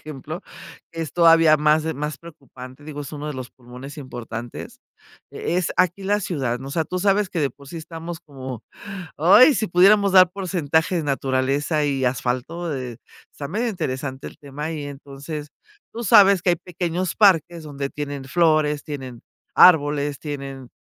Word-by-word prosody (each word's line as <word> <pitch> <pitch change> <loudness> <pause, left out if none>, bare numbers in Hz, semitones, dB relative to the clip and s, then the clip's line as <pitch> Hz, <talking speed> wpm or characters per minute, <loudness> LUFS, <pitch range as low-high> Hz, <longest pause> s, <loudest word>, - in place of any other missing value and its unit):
ejemplo, 155 +4 -8 0.5
es 165 -4 -5
todavía 165 -2 +6
más 150 +1 +2
más 150 +1 -4
preocupante, 135 -5 -13
digo, 145 -1 -7
es 145 - -9
uno 150 0 -5
de - - -3
los 130 -1 -7
pulmones 125 +3 -11
importantes. 120 - -8 0.5
Eh, - - -3
es 180 - 0
aquí 180 +2 +1
la 205 +2 +1
ciudad, 135 - -2
¿no?, 135 +2 -8
o - - -7
sea, 160 0 0
tú 185 - -4
sabes 195 +1 +2
que 175 - -3
de 140 - +1
por 140 +2 -16
sí 170 - -8
estamos 165 +1 -7
como, 130 -5 -9 0.5
¡ay!, 245 - +7
si 220 - 0
pudiéramos 195 +3 +5
dar 185 -1 +7
porcentaje 170 -3 0
naturaleza 140 +2 0
y 135 -2 0
asfalto, 130 +7 -2
eh, 125 -3 -6 0.3
está 140 - -7
medio 215 +10 -2
interesante 135 -7 -4
el - - -13
tema 150 +3 -6
y 155 -2 -5
entonces, 145 +1 -8 0.4
tú 235 - -6
sabes 200 -3 +6
que 180 - +3
hay - - +2
pequeños 175 0 -3
parques 170 -5 +3
donde 140 -2 -5
tienen 145 -2 -6
flores, 155 -1 +2
tienen 130 -5 -7 0.3
árboles, 145 -4 +5
tienen 135 -4 -7
150 Hz, 165 wpm, -22 LUFS, 135-175 Hz, 0.5 s, ay